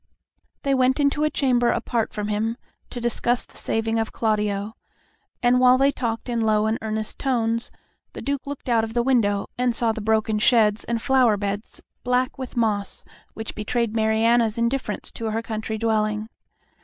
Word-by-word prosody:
They 275 Hz, -, +1 dB
went 260 Hz, +1 st, +3 dB
into 290 Hz, +1 st, +2 dB
a 305 Hz, -, +3 dB
chamber 250 Hz, -4 st, +2 dB
apart 235 Hz, -1 st, -1 dB
from 210 Hz, 0 st, -4 dB
him 220 Hz, +2 st, -1 dB, 0.3 s
to 245 Hz, -, -6 dB
discuss 240 Hz, +1 st, 0 dB
the -, -, -23 dB
saving 225 Hz, 0 st, -1 dB
of 225 Hz, -, -2 dB
Claudio, 210 Hz, -1 st, -1 dB, 0.7 s
and 245 Hz, +1 st, +4 dB
while 255 Hz, 0 st, +6 dB
they 275 Hz, +1 st, +4 dB
talked 230 Hz, -4 st, -3 dB
in 235 Hz, -2 st, -1 dB
low 215 Hz, -1 st, +2 dB
and 220 Hz, +1 st, 0 dB
earnest 220 Hz, 0 st, -3 dB
tones, 230 Hz, -3 st, 0 dB, 0.4 s
the -, -, -7 dB
Duke 280 Hz, -1 st, -3 dB
looked 285 Hz, -2 st, -7 dB
out 230 Hz, -2 st, +3 dB
of 225 Hz, 0 st, -4 dB
the 240 Hz, -, +2 dB
window 215 Hz, -6 st, +2 dB
and 250 Hz, -2 st, +1 dB
saw 230 Hz, 0 st, +2 dB
the 220 Hz, -, -5 dB
broken 220 Hz, 0 st, +1 dB
sheds 215 Hz, -2 st, +3 dB
and 235 Hz, -1 st, -1 dB
flower 250 Hz, -3 st, +3 dB
beds 205 Hz, +1 st, -5 dB, 0.2 s
black 250 Hz, +1 st, 0 dB
with 260 Hz, -1 st, -6 dB
moss, 210 Hz, -4 st, -1 dB, 0.3 s
which 220 Hz, 0 st, -6 dB
betrayed 225 Hz, +1 st, -1 dB
Mariana's 225 Hz, +1 st, +2 dB
indifference 235 Hz, -2 st, -2 dB
to 230 Hz, -, -6 dB
her 220 Hz, +1 st, -2 dB
country 220 Hz, -1 st, -4 dB
dwelling. 215 Hz, -1 st, 0 dB
225 Hz, 175 wpm, -23 LUFS, 215-245 Hz, 0.7 s, while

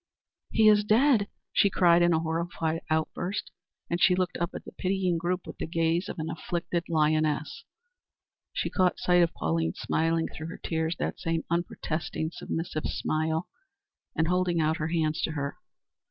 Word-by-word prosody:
"He 220 Hz, -1 st, +4 dB
is 210 Hz, -1 st, +6 dB
dead," 220 Hz, 0 st, +4 dB, 0.3 s
she 200 Hz, -, +4 dB
cried, 175 Hz, -2 st, +5 dB
in 175 Hz, 0 st, +4 dB
a 160 Hz, -, +3 dB
horrified 165 Hz, 0 st, -2 dB
outburst, 165 Hz, +5 st, -1 dB, 0.4 s
and 170 Hz, +1 st, -2 dB
she 180 Hz, -, +6 dB
looked 180 Hz, -1 st, -1 dB
up 170 Hz, +1 st, -2 dB
at -, -, -7 dB
the -, -, -9 dB
pitying 185 Hz, -2 st, 0 dB
group 175 Hz, +2 st, -1 dB
with -, -, -9 dB
the -, -, -2 dB
gaze 165 Hz, +2 st, 0 dB
of -, -, -6 dB
an 160 Hz, -1 st, -3 dB
afflicted 170 Hz, +1 st, -3 dB
lioness. 155 Hz, -, +1 dB, 0.9 s
She -, -, -2 dB
caught 185 Hz, -2 st, +2 dB
sight 180 Hz, 0 st, +3 dB
of 170 Hz, 0 st, +3 dB
Pauline 80 Hz, 0 st, 0 dB
smiling 165 Hz, 0 st, 0 dB
through 160 Hz, -, -7 dB
her 165 Hz, -, -7 dB
tears 160 Hz, 0 st, -1 dB
that -, -, -3 dB
same 165 Hz, -1 st, -1 dB
unprotesting, 165 Hz, -2 st, -2 dB
submissive 165 Hz, -2 st, -4 dB
smile 160 Hz, +2 st, -1 dB, 0.7 s
and 160 Hz, -, +1 dB
holding 180 Hz, -1 st, +1 dB
out 160 Hz, +1 st, +2 dB
her 155 Hz, -2 st, -2 dB
hands 160 Hz, 0 st, 0 dB
to 160 Hz, -, -1 dB
her. 140 Hz, -2 st, -3 dB
165 Hz, 170 wpm, -28 LUFS, 160-180 Hz, 0.9 s, is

